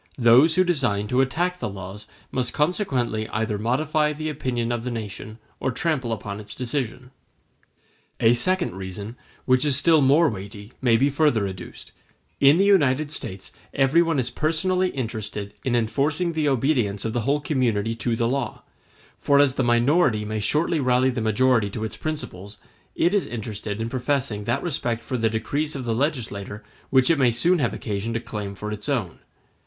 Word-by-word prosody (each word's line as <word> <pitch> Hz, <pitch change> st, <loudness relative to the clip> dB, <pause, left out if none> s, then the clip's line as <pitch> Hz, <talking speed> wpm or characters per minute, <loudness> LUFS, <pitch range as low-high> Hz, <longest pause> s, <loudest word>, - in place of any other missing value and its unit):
Those 130 Hz, +6 st, +6 dB
who 185 Hz, -, +5 dB
design 125 Hz, -, 0 dB
to 125 Hz, +1 st, +3 dB
attack 175 Hz, +7 st, -1 dB
the -, -, -3 dB
laws 100 Hz, +1 st, -8 dB, 0.2 s
must 125 Hz, -2 st, -1 dB
consequently 135 Hz, -, 0 dB
either 110 Hz, -1 st, -2 dB
modify 150 Hz, +6 st, +1 dB
the 155 Hz, +1 st, -4 dB
opinion 125 Hz, -5 st, -2 dB
of 120 Hz, -1 st, -2 dB
the 125 Hz, -, -3 dB
nation 110 Hz, -1 st, -6 dB, 0.2 s
or -, -, -1 dB
trample 130 Hz, -2 st, -1 dB
upon 105 Hz, -2 st, -4 dB
its 105 Hz, -1 st, -10 dB
decision. 125 Hz, 0 st, -4 dB, 1.1 s
A 115 Hz, +1 st, +5 dB
second 180 Hz, -, +2 dB
reason, 95 Hz, +4 st, -7 dB, 0.3 s
which 130 Hz, 0 st, +3 dB
is 145 Hz, -3 st, +2 dB
still 160 Hz, +2 st, +4 dB
more 145 Hz, +5 st, +5 dB
weighty, 100 Hz, 0 st, -7 dB
may 120 Hz, -3 st, +4 dB
be 140 Hz, +4 st, +2 dB
further 140 Hz, -8 st, +2 dB
adduced; 95 Hz, -2 st, -9 dB, 0.5 s
in 140 Hz, +3 st, +6 dB
the 195 Hz, -, +3 dB
United 150 Hz, -7 st, +3 dB
States 95 Hz, -8 st, -6 dB, 0.2 s
everyone 160 Hz, +4 st, +3 dB
is 125 Hz, -2 st, -1 dB
personally 180 Hz, +4 st, 0 dB
interested 110 Hz, -, -5 dB
in 125 Hz, -2 st, 0 dB
enforcing 145 Hz, +9 st, 0 dB
the 155 Hz, -2 st, +1 dB
obedience 120 Hz, -7 st, 0 dB
of 110 Hz, -, -2 dB
the 120 Hz, -, 0 dB
whole 140 Hz, +6 st, +1 dB
community 115 Hz, -7 st, 0 dB
to 115 Hz, 0 st, -1 dB
the 115 Hz, 0 st, 0 dB
law; 130 Hz, -2 st, -3 dB, 0.6 s
for 140 Hz, -, +3 dB
as 140 Hz, -2 st, +4 dB
the 130 Hz, -, 0 dB
minority 120 Hz, -1 st, +3 dB
may 110 Hz, +1 st, -3 dB
shortly 150 Hz, +9 st, +1 dB
rally 130 Hz, 0 st, +2 dB
the 120 Hz, -2 st, -3 dB
majority 110 Hz, 0 st, +2 dB
to 110 Hz, +2 st, -5 dB
its 110 Hz, -, -4 dB
principles, 105 Hz, -10 st, -6 dB, 0.4 s
it 175 Hz, +3 st, +2 dB
is 205 Hz, -, +1 dB
interested 110 Hz, -2 st, -5 dB
in 115 Hz, -, -2 dB
professing 125 Hz, -4 st, -2 dB
that -, -, -1 dB
respect 120 Hz, -8 st, -2 dB
for 130 Hz, -, -3 dB
the 115 Hz, -2 st, +1 dB
decrees 145 Hz, +8 st, -2 dB
of 130 Hz, -3 st, -5 dB
the 115 Hz, -, 0 dB
legislator 110 Hz, -6 st, -3 dB, 0.3 s
which 130 Hz, +2 st, +4 dB
it 160 Hz, -, +2 dB
may 130 Hz, -2 st, +5 dB
soon 165 Hz, +10 st, +2 dB
have 125 Hz, -, +1 dB
occasion 105 Hz, +1 st, -4 dB
to -, -, 0 dB
claim 105 Hz, -3 st, -6 dB
for 105 Hz, +2 st, -6 dB
its 105 Hz, +6 st, -6 dB
own. 115 Hz, -, -2 dB
125 Hz, 180 wpm, -24 LUFS, 110-145 Hz, 1.1 s, Those